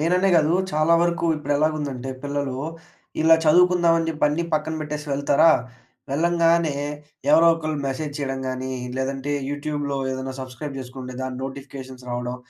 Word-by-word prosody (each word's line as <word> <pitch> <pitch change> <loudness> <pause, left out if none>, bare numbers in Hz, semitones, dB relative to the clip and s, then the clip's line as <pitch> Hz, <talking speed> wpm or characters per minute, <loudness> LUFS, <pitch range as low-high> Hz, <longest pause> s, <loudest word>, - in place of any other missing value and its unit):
నేననే 180 +4 +2
కాదు 155 0 +3 0.2
చాలా 155 +2 +4
వరకు 170 0 +1
ఇప్పుడు 145 -1 -2
ఎలాగుందంటే 145 -4 -1
పిల్లలు, 140 -2 -2 0.6
ఇలా 165 +1 +7
చదువుకుందాం 175 +1 +5
అని 165 - -1
చెప్పి 150 -2 -1
అన్ని 155 +3 -1
పక్కన 155 +1 -1
పెట్టేసి 150 0 -5
వెళ్తారా, 140 +3 +4 0.6
వెళ్ళంగానే 165 0 +2 0.6
ఎవరోకళ్ళు 160 -1 +4
మెసేజ్ 145 +2 -3
చేయడం 135 -2 -3
గాని, 130 0 -3 0.2
లేదంటే 135 +1 -2 0.2
యూట్యూబ్‌లో 145 -1 -3 0.2
ఏదైనా 130 0 -4
సబ్‌స్క్రైబ్ 130 +2 -7
చేసుకుంటే 125 0 -8
దాన్ని 130 -1 -4
నోటిఫికేషన్స్ 135 -1 -8
రావడం. 125 0 -3
145 Hz, 135 wpm, -23 LUFS, 135-160 Hz, 0.6 s, ఇలా